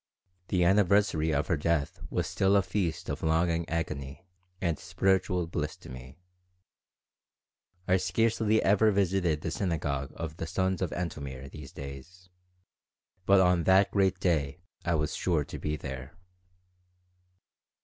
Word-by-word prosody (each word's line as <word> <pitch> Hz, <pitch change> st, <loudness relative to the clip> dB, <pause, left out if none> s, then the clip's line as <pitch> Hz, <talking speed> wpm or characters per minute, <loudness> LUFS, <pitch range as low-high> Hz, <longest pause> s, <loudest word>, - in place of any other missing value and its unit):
The 90 Hz, -2 st, +1 dB
anniversary 95 Hz, -3 st, +3 dB
of 75 Hz, 0 st, +1 dB
her 80 Hz, -, 0 dB
death 75 Hz, -1 st, -1 dB
was -, -, -1 dB
still 95 Hz, +1 st, +2 dB
a 100 Hz, -, +4 dB
feast 90 Hz, -3 st, -2 dB
of -, -, -4 dB
longing 85 Hz, +1 st, +1 dB
agony 75 Hz, -2 st, -4 dB, 0.3 s
and 85 Hz, -3 st, -1 dB
spiritual 90 Hz, 0 st, +1 dB
bliss 80 Hz, -2 st, -3 dB
to -, -, -13 dB
me. 65 Hz, +2 st, -10 dB, 1.7 s
I 95 Hz, -, +4 dB
scarcely 110 Hz, +4 st, +1 dB
ever 105 Hz, +2 st, +4 dB
visited 95 Hz, -6 st, +1 dB
the 80 Hz, -, -3 dB
synagogue 75 Hz, -7 st, -2 dB
of 80 Hz, -1 st, -6 dB
the 80 Hz, -, -4 dB
Sons 95 Hz, +2 st, -1 dB
of 90 Hz, -, 0 dB
Antomir 70 Hz, -6 st, -5 dB
these 75 Hz, -3 st, -10 dB
days, 75 Hz, +7 st, -10 dB, 1.0 s
but 100 Hz, -1 st, +6 dB
on 90 Hz, -2 st, +3 dB
that 95 Hz, +1 st, +5 dB
great 95 Hz, -2 st, +2 dB
day 75 Hz, -6 st, 0 dB, 0.3 s
I 85 Hz, -1 st, +1 dB
was 75 Hz, -1 st, -1 dB
sure 85 Hz, -5 st, 0 dB
to -, -, -8 dB
be 75 Hz, 0 st, -2 dB
there. 65 Hz, -1 st, -7 dB
85 Hz, 140 wpm, -29 LUFS, 75-95 Hz, 1.7 s, but